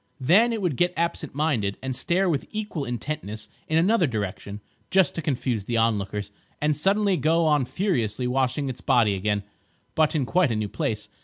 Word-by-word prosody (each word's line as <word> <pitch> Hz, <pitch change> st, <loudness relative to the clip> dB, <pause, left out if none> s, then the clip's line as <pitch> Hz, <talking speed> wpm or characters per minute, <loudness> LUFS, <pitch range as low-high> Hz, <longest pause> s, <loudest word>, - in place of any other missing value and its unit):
Then 190 Hz, -, +4 dB
it 220 Hz, -3 st, -2 dB
would 160 Hz, -8 st, 0 dB
get 175 Hz, 0 st, +1 dB
absent 165 Hz, -3 st, -2 dB
minded, 130 Hz, -10 st, 0 dB
and 130 Hz, -1 st, -4 dB
stare 185 Hz, +7 st, +1 dB
with 155 Hz, -6 st, -1 dB
equal 210 Hz, -9 st, -4 dB
intentness 110 Hz, -4 st, -5 dB, 0.2 s
in 155 Hz, -, +1 dB
another 185 Hz, +1 st, +3 dB
direction 100 Hz, -3 st, -4 dB, 0.3 s
(just 190 Hz, -2 st, +3 dB
to 165 Hz, -, -3 dB
confuse 125 Hz, -, -1 dB
the 120 Hz, +1 st, -1 dB
onlookers), 105 Hz, -2 st, 0 dB, 0.3 s
and 150 Hz, 0 st, +1 dB
suddenly 195 Hz, +4 st, +2 dB
go 165 Hz, +3 st, +2 dB
on 150 Hz, -4 st, +3 dB
furiously 125 Hz, -, -1 dB
washing 130 Hz, +2 st, 0 dB
its 125 Hz, -2 st, -5 dB
body 110 Hz, -4 st, +3 dB
again, 100 Hz, +1 st, -1 dB, 0.5 s
but 155 Hz, 0 st, +2 dB
in 140 Hz, -4 st, +1 dB
quite 180 Hz, -2 st, +2 dB
a -, -, 0 dB
new 105 Hz, -1 st, -2 dB
place. 105 Hz, +1 st, -3 dB
140 Hz, 180 wpm, -25 LUFS, 110-170 Hz, 0.5 s, Then